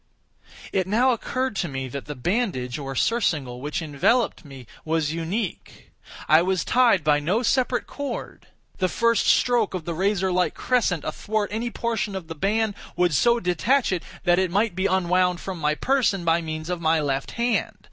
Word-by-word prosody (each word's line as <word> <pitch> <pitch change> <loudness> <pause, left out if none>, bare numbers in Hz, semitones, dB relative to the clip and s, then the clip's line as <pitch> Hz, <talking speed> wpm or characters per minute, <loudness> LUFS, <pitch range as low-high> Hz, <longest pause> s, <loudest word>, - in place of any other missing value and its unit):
It 190 -2 +1
now 240 +6 +3
occurred 255 +1 -2
to 185 - -1
me 135 -3 -4
that 140 +2 -6
the 150 - -6
bandage, 140 - -1
or 135 -1 -5
surcingle, 145 - 0
which 150 +5 -3
enveloped 160 - +1
me, 135 -4 -11 0.2
was 160 -1 0
unique. 170 +5 -5 0.4
I 155 +2 +6
was 185 -1 0
tied 235 -8 +3
by 150 -1 +3
no 185 +11 0
separate 250 0 +1
cord. 285 -1 -6 0.3
The 185 -1 +1
first 230 0 +2
stroke 235 -6 +3
of 175 -4 -5
the 170 - -3
razorlike 190 0 +1
crescent 210 - 0
athwart 205 +6 -2
any 230 +2 -2
portion 220 -4 -2
of 180 -3 -6
the - - -4
band, 205 +6 0 0.2
would 175 -2 +2
so 235 - +3
detach 210 +9 +1
it 180 -3 -1 0.2
that 175 -1 +3
it 190 -1 +1
might 205 +3 +1
be 190 +2 0
unwound 180 -1 +2
from 190 -3 -6
my 150 0 +1
person 225 - +1
by 165 +1 +3
means 155 +1 -5
of 175 -1 -3
my 160 0 +3
left 135 -2 -2
hand. 235 0 -1
185 Hz, 175 wpm, -24 LUFS, 160-225 Hz, 0.4 s, I